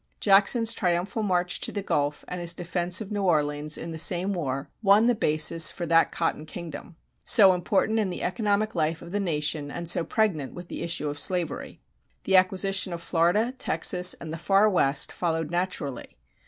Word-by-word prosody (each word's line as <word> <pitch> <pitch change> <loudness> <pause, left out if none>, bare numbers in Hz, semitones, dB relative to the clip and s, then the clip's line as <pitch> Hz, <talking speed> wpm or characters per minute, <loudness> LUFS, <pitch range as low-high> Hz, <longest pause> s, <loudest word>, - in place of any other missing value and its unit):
Jackson's 220 +3 +4
triumphal 185 +2 -2
march 180 -3 -1
to - - -2
the 205 - -4
Gulf 145 -4 -2
and 180 -1 -6
his 170 0 -1
defense 175 +2 -2
of 215 -1 -8
New 205 -1 -3
Orleans 150 -4 0
in 165 - -6
the 160 - -6
same 185 +4 +1
war 140 -6 -4
won 205 +1 +4
the 245 - +3
basis 155 -4 +3
for 175 - -6
that 165 0 +2
Cotton 160 -2 -3
Kingdom, 170 0 -9 0.3
so 195 -4 +6
important 200 +5 0
in 205 -3 -1
the 180 - -6
economic 210 +2 -1
life 160 -1 -2
of 170 - -11
the 205 - -2
nation 150 -5 -2
and 170 +4 -7
so 170 0 +2
pregnant 170 - -2
with 175 0 -10
the - - -7
issue 165 -3 -3
of 145 0 -5
slavery.[189:1] 175 -2 0 0.4
The 195 - +1
acquisition 190 0 +2
of 170 - -7
Florida, 180 +10 0
Texas, 180 -1 +2
and 160 -1 -9
the 165 - -6
Far 195 +5 +3
West 140 -8 +1
followed 165 -2 -3
naturally. 175 -6 -4
175 Hz, 185 wpm, -25 LUFS, 160-195 Hz, 0.4 s, so